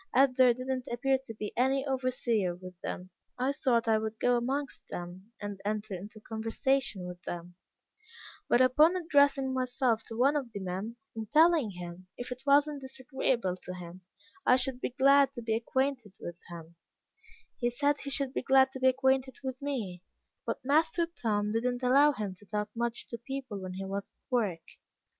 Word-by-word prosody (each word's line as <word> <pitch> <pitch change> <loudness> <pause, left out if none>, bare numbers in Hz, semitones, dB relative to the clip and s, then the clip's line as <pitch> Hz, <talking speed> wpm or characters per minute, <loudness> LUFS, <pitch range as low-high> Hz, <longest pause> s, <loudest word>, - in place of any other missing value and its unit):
As 265 0 +5
there 255 -1 +6
did 255 +1 -6
not 260 0 -2
appear 265 +2 +1
to 225 - -6
be 210 -1 -5
any 265 +2 +2
overseer 250 -8 0
with 185 0 -10
them, 185 +1 -5 0.3
I 255 +2 +1
thought 250 -5 +1
I 220 -1 +4
would 220 0 -4
go 245 0 +3
amongst 265 +4 -2
them, 180 +4 -7
and 205 -1 -6
enter 210 0 -2
into 205 +4 -8
conversation 225 -1 -1
with 180 0 -8
them; 175 0 -6 1.0
but 240 - +5
upon 300 +7 +5
addressing 285 -6 +3
myself 255 -2 +1
to 225 - -7
one 275 +5 +4
of 260 -6 -2
the 200 - -4
men, 190 +5 -4 0.2
and 220 -2 -5
telling 315 -5 +5
him, 180 -1 -8
if 245 - -6
it 250 0 -5
was 285 +1 +6
not 295 -2 -6
disagreeable 260 -6 -1
to 180 - -6
him, 180 0 -9 0.4
I 250 - +6
should 255 0 -1
be - - -1
glad 275 +2 +5
to 240 - -6
become 225 0 0
acquainted 260 -7 -1
with 175 0 -7
him, 170 -1 -10 0.8
he 240 - +2
said 285 +4 +1
he 280 - -5
should 275 -1 +1
be - - -1
glad 265 0 +5
to 265 - -7
be 260 - +4
acquainted 265 0 +2
with 260 0 -4
me, 225 -11 -3 0.5
but - - -3
master 320 +4 +3
Tom 210 -11 -1
did 225 +2 0
not 250 0 -1
allow 280 +4 +6
him 210 -8 -4
to 205 - -17
talk 210 0 -2
much 235 0 -2
to 235 - -6
people 260 -4 -5
when 185 -1 -6
he 190 +1 -5
was 195 +1 -5
at - - -52
work. 205 -10 0
245 Hz, 190 wpm, -30 LUFS, 205-270 Hz, 1.0 s, there